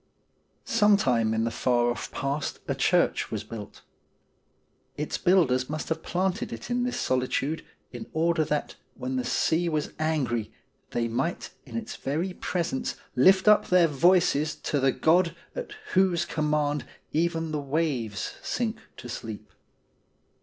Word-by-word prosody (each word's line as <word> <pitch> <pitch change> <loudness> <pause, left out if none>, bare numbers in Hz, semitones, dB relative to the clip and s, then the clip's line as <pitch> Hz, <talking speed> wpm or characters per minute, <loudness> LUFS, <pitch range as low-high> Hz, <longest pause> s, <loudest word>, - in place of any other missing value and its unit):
Sometime 200 - +3
in 110 0 +1
the 115 - 0
far 120 +1 +2
off 120 - -5
past 140 +2 -2
a - - +1
church - - +2
was - - -3
built. 105 -3 -9 1.1
Its 150 - -3
builders 145 -9 +3
must 155 0 -4
have 160 0 -1
planted 185 +4 -1
it - - -7
in 245 0 +1
this 250 0 -1
solitude 130 +4 0 0.3
in 120 -2 -7
order 165 0 +2
that 150 -1 -2 0.2
when 130 +1 -4
the 125 - 0
sea 170 +6 +1
was 155 -2 -2
angry 130 -9 0 0.4
they 115 -1 -1
might 130 +9 -2 0.2
in - - -5
its 225 -1 -5
very 165 +7 -2
presence 170 -7 -2 0.2
lift 190 +10 +5
up 210 0 +6
their 180 -2 +5
voices 155 0 +3
to 145 - -2
the 135 0 +3
God 165 +3 +3 0.2
atjWhose 190 - 0
command 150 -1 0 0.3
even 165 0 0
the 150 -1 -1
waves 135 -8 -1
sink 230 -3 -2 0.2
to - - -9
sleep. 110 -3 -7
155 Hz, 140 wpm, -27 LUFS, 130-175 Hz, 1.1 s, up